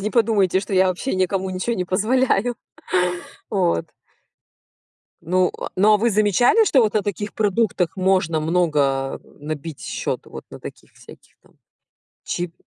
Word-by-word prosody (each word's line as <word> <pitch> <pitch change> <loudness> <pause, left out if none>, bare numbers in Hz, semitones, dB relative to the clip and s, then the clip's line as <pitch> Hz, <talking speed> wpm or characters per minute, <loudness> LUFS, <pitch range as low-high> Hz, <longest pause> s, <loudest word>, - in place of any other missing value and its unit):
Не 210 +2 -2
подумайте, 205 -6 +2
что 195 0 -4
я 185 0 +4
вообще 185 +8 -2
никому 190 0 0
ничего 185 +6 -2
не 180 - -1
позволяю. 235 +4 +1 0.9
Вот. 85 - 0 1.4
Ну, 180 +2 +1
а, - - -4
ну 205 +3 +5
а 210 - +6
вы 235 +2 +2
замечали, 215 - +4
что 280 -10 +4
вот 215 -3 +1
на 215 - +2
таких 205 +1 -4
продуктах 205 -4 0
можно 185 -4 +1
много 150 -5 0 0.2
набить 150 0 -6
счёт? - - -3
Вот - - -10
на - - -10
таких - - -11
всяких - - -17
там - - -26 0.7
чип 175 -1 -4
190 Hz, 145 wpm, -21 LUFS, 175-215 Hz, 1.4 s, а